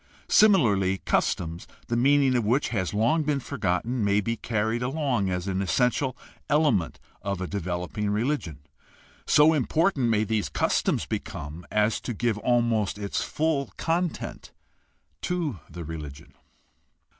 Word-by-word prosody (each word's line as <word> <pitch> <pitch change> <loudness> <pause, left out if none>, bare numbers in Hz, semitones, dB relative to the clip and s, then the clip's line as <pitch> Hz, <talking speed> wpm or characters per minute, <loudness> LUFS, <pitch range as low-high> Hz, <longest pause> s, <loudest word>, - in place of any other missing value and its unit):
Similarly, 105 - +4
customs, 85 0 -1 0.2
the 120 - -2
meaning 135 +1 +4
of 120 - +2
which 120 +7 +1
has 95 -6 -1
long 115 +10 +2
been 150 -2 0
forgotten, 110 +2 -1
may 100 0 +3
be 115 +3 -1
carried 110 +1 -1
along 125 -6 0
as 90 +1 -2
essential 125 +7 0 0.3
elements 145 - +2 0.2
of 100 -2 -3
a 95 - -2
developing 90 +2 -3
religion. 105 - -1 0.7
So 150 +2 +6
important 150 -1 +1
may 110 -1 +2
these 110 -1 -1
customs - - 0
become 75 +4 -6
as 105 +1 +1
to 120 - -4
give 115 -1 0
almost 115 -3 +1
its 100 -1 -2
full 150 -3 -1
content 170 +1 -2 0.7
to 165 - -2
the 85 +2 -7
religion. 75 -3 -8
115 Hz, 130 wpm, -26 LUFS, 95-140 Hz, 0.7 s, So